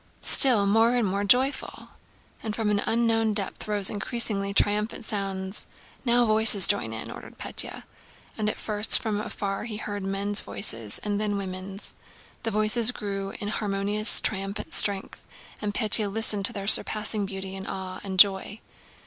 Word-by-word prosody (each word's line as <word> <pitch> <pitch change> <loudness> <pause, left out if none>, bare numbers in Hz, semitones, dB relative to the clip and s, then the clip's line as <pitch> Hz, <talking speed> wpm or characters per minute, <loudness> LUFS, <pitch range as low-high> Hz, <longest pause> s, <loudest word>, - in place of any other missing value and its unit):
Still 245 -8 +4
more 225 +4 +3
and 240 -3 +1
more 200 +2 -2
joyful!" 255 +7 +1 0.5
And 215 -1 -4
from 220 -2 -1
an 205 -1 +1
unknown 225 -2 +1
depth 200 0 -1
rose 205 -2 +2
increasingly 205 -2 -1
triumphant 210 +3 0
sounds. 195 -2 -3 0.4
"Now 240 -1 +3
voices 215 -2 +4
join 200 - 0
in!" 110 0 -6
ordered - - -11
Pétya. - - -3 0.5
And 210 -1 -1
at - - -5
first 210 0 +6
from 210 -2 -3
afar 200 -1 -5
he 220 -3 -5
heard 205 -1 -5
men's 200 +2 0
voices 115 - -4
and 205 0 -2
then 205 -1 -1
women's. 190 +1 -7 0.5
The 230 - -2
voices 215 +2 +1
grew 195 -4 -5
in 205 - -4
harmonious 205 +1 0
triumphant 195 0 -3
strength, 200 -2 +1 0.4
and 210 -1 -2
Pétya 210 -1 0
listened 210 -2 +1
to - - -1
their 200 -1 -6
surpassing 215 0 +3
beauty 190 -1 -7
in 195 0 -8
awe 185 -1 -6
and 190 -1 -5
joy. 195 +2 +4
205 Hz, 155 wpm, -25 LUFS, 195-215 Hz, 0.5 s, first